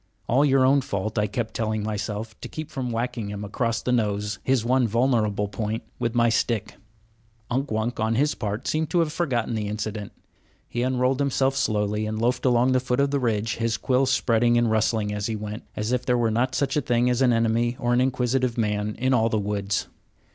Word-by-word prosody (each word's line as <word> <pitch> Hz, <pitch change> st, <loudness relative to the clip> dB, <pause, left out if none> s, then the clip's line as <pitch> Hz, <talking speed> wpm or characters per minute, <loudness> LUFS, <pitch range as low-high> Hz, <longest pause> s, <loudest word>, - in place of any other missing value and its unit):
"All 130 Hz, +5 st, +3 dB
your 135 Hz, -2 st, +4 dB
own 140 Hz, +1 st, +4 dB
fault," 105 Hz, -1 st, -2 dB
I 105 Hz, -, +1 dB
kept 110 Hz, +2 st, -3 dB
telling 110 Hz, -1 st, -1 dB
myself, 105 Hz, +1 st, -4 dB
to -, -, -5 dB
keep 155 Hz, -1 st, -7 dB
from 130 Hz, -2 st, -3 dB
whacking 115 Hz, -1 st, -2 dB
him 105 Hz, 0 st, -5 dB
across 115 Hz, +2 st, -1 dB
the 125 Hz, -, 0 dB
nose, 105 Hz, -3 st, 0 dB
his 130 Hz, -3 st, +1 dB
one 125 Hz, 0 st, +3 dB
vulnerable 110 Hz, -3 st, +1 dB
point, 105 Hz, +2 st, -3 dB, 0.2 s
with 115 Hz, 0 st, -1 dB
my 120 Hz, 0 st, +4 dB
stick. 115 Hz, -1 st, 0 dB, 0.7 s
Unk 135 Hz, +3 st, 0 dB
Wunk, 110 Hz, +2 st, -2 dB
on 110 Hz, +1 st, +1 dB
his 145 Hz, +4 st, +2 dB
part, 105 Hz, 0 st, -4 dB
seemed 155 Hz, 0 st, 0 dB
to 175 Hz, -, +2 dB
have 155 Hz, -2 st, -1 dB
forgotten 125 Hz, -9 st, -1 dB
the 105 Hz, -2 st, -2 dB
incident. 105 Hz, 0 st, -4 dB, 0.6 s
He 120 Hz, -, -3 dB
unrolled 130 Hz, +1 st, +1 dB
himself 135 Hz, -1 st, +1 dB
slowly 105 Hz, -3 st, 0 dB
and 110 Hz, 0 st, -3 dB
loafed 120 Hz, +3 st, 0 dB
along 125 Hz, 0 st, +4 dB
the 130 Hz, -, +3 dB
foot 125 Hz, 0 st, -1 dB
of 140 Hz, 0 st, +2 dB
the 140 Hz, -, +1 dB
ridge, 110 Hz, -3 st, -1 dB
his 115 Hz, -1 st, 0 dB
quills 130 Hz, +3 st, +1 dB
spreading 120 Hz, -2 st, +3 dB
and 120 Hz, -1 st, +2 dB
rustling 110 Hz, -1 st, +1 dB
as 105 Hz, 0 st, -2 dB
he 110 Hz, -, -2 dB
went, 105 Hz, +1 st, -6 dB
as 105 Hz, +2 st, -2 dB
if 125 Hz, -1 st, 0 dB
there 125 Hz, -1 st, +1 dB
were 115 Hz, -2 st, +1 dB
not 130 Hz, +4 st, 0 dB
such 140 Hz, -1 st, 0 dB
a 150 Hz, -, +2 dB
thing 120 Hz, -1 st, +1 dB
as 125 Hz, +1 st, +1 dB
an 130 Hz, -2 st, +5 dB
enemy 115 Hz, +1 st, +1 dB
or 120 Hz, 0 st, +1 dB
an 125 Hz, -, +3 dB
inquisitive 130 Hz, -1 st, 0 dB
man 105 Hz, -1 st, -1 dB
in 130 Hz, +2 st, +1 dB
all 115 Hz, -2 st, +3 dB
the 110 Hz, -, 0 dB
woods. 100 Hz, -1 st, -1 dB
115 Hz, 215 wpm, -25 LUFS, 110-125 Hz, 0.7 s, an